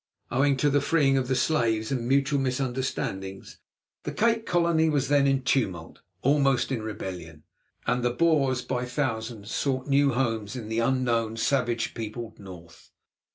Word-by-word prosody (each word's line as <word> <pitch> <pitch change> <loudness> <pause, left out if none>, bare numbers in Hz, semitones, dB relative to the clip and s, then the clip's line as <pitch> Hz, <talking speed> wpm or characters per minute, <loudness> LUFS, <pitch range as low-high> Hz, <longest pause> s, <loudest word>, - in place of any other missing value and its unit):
Owing 135 +2 +2
to 145 +2 +2
the 145 0 +3
freeing 140 -2 +3
of 130 -2 0
the 130 - +1
slaves 115 -7 +1
and 120 -3 -1
mutual 140 +2 +2
misunderstandings, 125 -7 -3 0.4
the - - -5
Cape 230 0 +1
Colony 170 -2 +2
was 140 -3 0
then 140 -1 +4
in 135 -1 +1
tumult, 95 -11 -1 0.2
almost 135 -2 +2
in 120 -4 -1
rebellion, 90 -7 -7 0.4
and 125 - +1
the 120 - +3
Boers, 135 -3 +2
by 125 0 -2
thousands, 115 -4 -3
sought 130 -2 -1
new 140 -1 +3
homes 115 -3 -1
in 115 -4 -6
the 110 +1 -1
unknown, 115 -3 0
savage 120 -2 0
peopled 115 0 -6
North. 90 -4 -13
125 Hz, 155 wpm, -26 LUFS, 115-140 Hz, 0.4 s, then